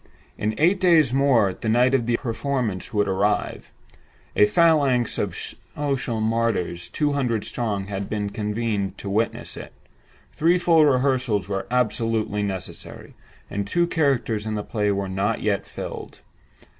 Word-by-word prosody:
In 110 +1 -2
eight 180 +5 +3
days 165 -8 +4
more 130 -8 +3
the 110 - -4
night 125 +4 +3
of 120 -4 +1
performance 115 -4 -2
would 105 -2 +1
arrive; 100 +2 -1 0.6
a 105 - +6
phalanx 140 -2 +3
of - - -2 0.4
social 135 -5 -1
martyrs 110 -6 -1
two 150 -1 0
hundred 125 -6 0
strong 105 -5 -2
had 100 0 -5
been 105 -1 -2
convened 105 -2 -2
to 100 - -5
witness 110 +3 -1
it; - - -9 0.6
three 170 +3 +3
full 170 -3 +4
rehearsals 130 -7 +1
were 95 -1 -3
absolutely 115 -3 0
necessary; 95 -4 -6 0.3
and 100 0 -3
two 170 +9 +2
characters 135 -10 0
in 110 - -2
the 105 - -3
play 105 -2 -1
were 100 0 -1
not 100 +4 -1 0.3
filled - - -8 0.4
yet. - - -22
115 Hz, 145 wpm, -23 LUFS, 105-135 Hz, 0.6 s, a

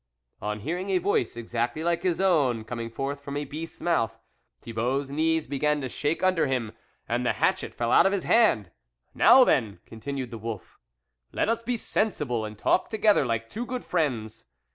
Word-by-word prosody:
On 105 0 -3
hearing 180 - -3
a 190 - +3
voice 175 - 0
exactly 120 +6 -2
like 170 0 +1
his 180 -2 0
own 145 -12 +2
coming 115 0 -5
forth 140 +4 -4
from 140 0 -5
a 145 - -3
beast's 160 +3 -7
mouth, 115 -10 0 0.4
Thibault's 125 +5 -2
knees 160 +2 +1
began 150 +2 0
to 130 - -3
shake 150 +8 -1
under 185 -5 +3
him, 125 -5 -1 0.4
and - - 0
the - - +1
hatchet - - 0
fell 120 0 -1
out - - +6
of - - +1
his 195 -2 -1
hand. 115 - +3 0.2
" - - -48
Now 260 - +9
then," 115 - +1
continued 130 +3 -6
the 115 - -7
wolf, 110 -3 -7 0.3
" - - -52
let - - 0
us 230 0 0
be 240 +1 -2
sensible 150 - -1
and 105 0 -8
talk 145 - +1
together 210 - +3
like 115 -1 -1
two 235 - -5
good 250 0 -4
friends. 125 -11 -2
140 Hz, 190 wpm, -26 LUFS, 115-175 Hz, 0.4 s, Now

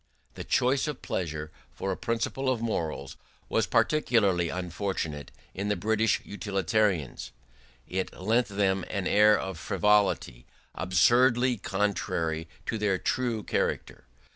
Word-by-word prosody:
The - - -7
choice 130 +4 +2
of 150 -3 -5
pleasure 75 -3 -3 0.2
for 95 - -2
a - - -1
principle 120 +3 -2
of 130 -3 +1
morals 95 -9 -3 0.3
was - - +1
particularly 100 - +2
unfortunate 85 -4 -3 0.2
in 100 +2 -3
the 105 - +1
British 110 +3 +1
utilitarians; 100 - -1 0.6
it 95 0 -2
lent 115 +5 +2
them 95 -2 0
an 100 -3 -2
air 105 +2 +5
of 95 -3 -5
frivolity 100 - +1 0.3
absurdly 120 +7 +3
contrary 85 -5 -1 0.2
to 110 - -2
their 105 -3 +1
true 120 0 -1
character. - - -2
100 Hz, 120 wpm, -28 LUFS, 90-115 Hz, 0.6 s, air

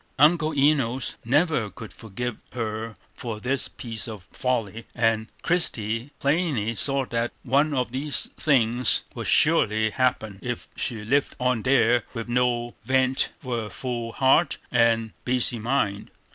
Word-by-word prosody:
Uncle 155 +2 +5
Enos 135 -3 +2
never 135 - +2
could 110 +1 -10
forgive 115 +2 -5 0.2
her 115 -1 -4 0.2
for 115 -3 -5
this 130 +4 -1
piece 115 -3 -4
of 105 -5 -7
folly, 115 -4 -2
and 115 -2 +1 0.2
Christie 115 -8 0
plainly 140 - +1
saw 135 +5 -1
that 120 0 -1
one 145 +3 +2
of 125 -2 0
three 135 +4 -3
things 125 -4 +1
would - - -5
surely 110 +1 +3
happen, 110 -6 0
if 120 -1 -4
she 110 -3 -3
lived 140 +5 +1
on 125 -2 +1
there 125 -1 +4
with 115 0 -4
no 120 -1 +1
vent 130 +2 +2
for 125 -2 -2
her 105 - -6
full 120 -2 -4
heart 140 +5 +3
and 115 -2 +3
busy 125 -1 +1
mind. 110 -4 -1
120 Hz, 140 wpm, -25 LUFS, 115-135 Hz, 0.2 s, Uncle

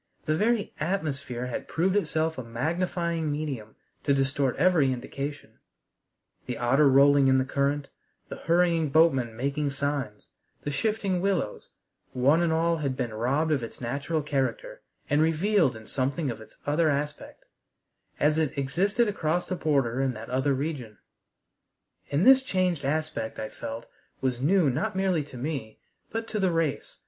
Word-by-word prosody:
The 155 - +1
very 215 +4 +1
atmosphere 145 -7 -2
had 125 - -5
proved 185 +4 +1
itself 160 -5 0
a - - -4
magnifying 165 +6 -1
medium 140 -8 -4 0.3
to 140 - +3
distort 135 -1 +1
every 160 -4 +3
indication: 140 +3 -6 0.9
the 125 -2 -3
otter 135 +4 +4
rolling 140 +1 +6
in 130 0 +5
the 130 - +1
current, 140 +1 0 0.4
the - - -6
hurrying 170 -2 +2
boatman 135 -7 +3
making 140 +3 -1
signs, 140 -6 -3 0.3
the 145 - -2
shifting 200 +2 0
willows, 190 - -1 0.4
one 140 +6 +3
and 170 -1 +2
all 165 +1 +2
had 140 -4 -2
been 120 -4 -2
robbed 135 +8 0
of 145 -4 +2
its 115 - -8
natural 140 +6 -2
character, 150 - -2 0.3
and 145 +1 +2
revealed 165 - +2
in 110 0 -11
something 135 +4 -1
of 115 - -8
its 110 - -15
other 155 +2 +2
aspect 150 +1 -4 0.7
as 150 +2 +3
it 155 -2 -1
existed 195 - +1
across 175 -3 -1
the 185 - -2
border 135 -7 +1
in 130 -2 0
that 110 +2 -8
other 130 +2 +1
region. 130 -7 -4 1.1
And 145 +7 +1
this 265 +1 +8
changed 185 - 0
aspect 155 -5 -2
I 110 - -4
felt 115 +1 -7 0.3
was 130 -2 -1
new 175 +3 +4
not 205 - -1
merely 190 -5 +1
to 130 - -11
me, 130 -5 -4 0.3
but 225 0 -3
to 215 - -2
the 190 -2 +2
race. 165 -4 -1
145 Hz, 155 wpm, -27 LUFS, 130-170 Hz, 1.1 s, this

